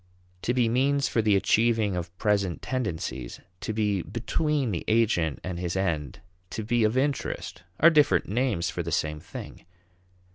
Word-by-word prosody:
To 120 Hz, -, 0 dB
be 125 Hz, -2 st, +3 dB
means 135 Hz, +4 st, +2 dB
for 115 Hz, -, +1 dB
the 105 Hz, -2 st, +3 dB
achieving 110 Hz, 0 st, +2 dB
of 90 Hz, 0 st, -5 dB
present 100 Hz, -5 st, 0 dB
tendencies, 80 Hz, -, -3 dB, 0.2 s
to -, -, -3 dB
be 105 Hz, -3 st, 0 dB
"between" 140 Hz, -, -1 dB
the 85 Hz, -, -3 dB
agent 110 Hz, -9 st, +2 dB
and 90 Hz, -1 st, -4 dB
his 90 Hz, 0 st, -2 dB
end, 80 Hz, -8 st, -2 dB, 0.3 s
to 110 Hz, -, -4 dB
be 120 Hz, +1 st, +1 dB
of 110 Hz, +3 st, +2 dB
interest, 135 Hz, -9 st, -2 dB, 0.2 s
are 170 Hz, +2 st, +7 dB
different 150 Hz, -3 st, +4 dB
names 105 Hz, -6 st, 0 dB
for 85 Hz, -, -3 dB
the 85 Hz, 0 st, -4 dB
same 75 Hz, 0 st, -1 dB
thing. -, -, -9 dB
105 Hz, 160 wpm, -27 LUFS, 85-120 Hz, 0.3 s, are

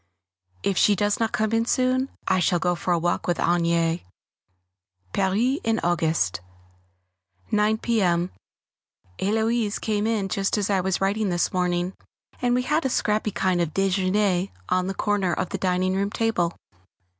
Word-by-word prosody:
If 195 Hz, -, +1 dB
she 205 Hz, -, +5 dB
does 205 Hz, +1 st, 0 dB
not 225 Hz, -1 st, 0 dB
come 220 Hz, 0 st, 0 dB
in 225 Hz, 0 st, +2 dB
soon 255 Hz, +1 st, +1 dB, 0.2 s
I 190 Hz, -1 st, +3 dB
shall 175 Hz, 0 st, +2 dB
go 175 Hz, +1 st, +1 dB
for 175 Hz, +1 st, -2 dB
a 175 Hz, -, +3 dB
walk 175 Hz, +1 st, -1 dB
with 175 Hz, -, +1 dB
Agnès. 170 Hz, -1 st, +1 dB
[Sidenote: -, -, -28 dB, 1.1 s
Paris 215 Hz, +8 st, +1 dB
in 225 Hz, 0 st, +1 dB
August] 160 Hz, -, 0 dB, 1.1 s
9 210 Hz, +1 st, +2 dB
p.m. 185 Hz, -7 st, +1 dB, 0.9 s
Héloise 220 Hz, +1 st, 0 dB
came 215 Hz, -1 st, -1 dB
in 215 Hz, -4 st, 0 dB
just 195 Hz, +2 st, 0 dB
as 205 Hz, 0 st, 0 dB
I 190 Hz, -2 st, +2 dB
was 190 Hz, +1 st, -1 dB
writing 200 Hz, +1 st, +1 dB
this 175 Hz, -1 st, 0 dB
morning, 180 Hz, 0 st, 0 dB, 0.5 s
and 245 Hz, -1 st, +2 dB
we 250 Hz, -, +1 dB
had 300 Hz, +5 st, +1 dB
a 265 Hz, -, 0 dB
scrappy 215 Hz, -3 st, 0 dB
kind 185 Hz, -3 st, 0 dB
of 165 Hz, -3 st, -2 dB
déjeûner 195 Hz, 0 st, +1 dB, 0.2 s
on 185 Hz, 0 st, +1 dB
the 195 Hz, -, -3 dB
corner 200 Hz, -4 st, 0 dB
of 185 Hz, +2 st, -2 dB
the -, -, -4 dB
dining 185 Hz, 0 st, +1 dB
room 200 Hz, +1 st, 0 dB
table. 205 Hz, -6 st, 0 dB
195 Hz, 165 wpm, -24 LUFS, 180-220 Hz, 1.1 s, she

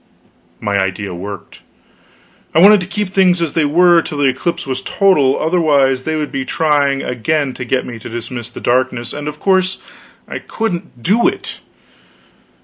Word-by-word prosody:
My 100 Hz, -2 st, 0 dB
idea 95 Hz, 0 st, -2 dB
worked. 100 Hz, +3 st, -8 dB, 1.0 s
I -, -, +5 dB
wanted 205 Hz, +4 st, +7 dB
to 180 Hz, -, -5 dB
keep 210 Hz, 0 st, -3 dB
things 185 Hz, -2 st, +3 dB
as 165 Hz, -3 st, -2 dB
they 160 Hz, -2 st, +2 dB
were 170 Hz, +3 st, +5 dB
till 155 Hz, -2 st, -6 dB
the 145 Hz, -, +1 dB
eclipse 150 Hz, +6 st, -1 dB
was 130 Hz, -1 st, -3 dB
total, 150 Hz, -10 st, +2 dB
otherwise 145 Hz, -6 st, +2 dB
they 160 Hz, -, -1 dB
would 150 Hz, -1 st, -3 dB
be 135 Hz, -, -2 dB
trying 145 Hz, -2 st, +1 dB
again 135 Hz, +3 st, -1 dB
to 125 Hz, -, -6 dB
get 130 Hz, +1 st, 0 dB
me 120 Hz, -2 st, -8 dB
to 110 Hz, -, -9 dB
dismiss 120 Hz, 0 st, -6 dB
the -, -, -10 dB
darkness, 120 Hz, -1 st, 0 dB
and 145 Hz, 0 st, -6 dB
of 150 Hz, 0 st, -5 dB
course 190 Hz, -1 st, +1 dB, 0.5 s
I -, -, -5 dB
couldn't 175 Hz, -, -5 dB
do 220 Hz, +6 st, +3 dB
it. -, -, -4 dB
145 Hz, 170 wpm, -16 LUFS, 125-175 Hz, 1.0 s, wanted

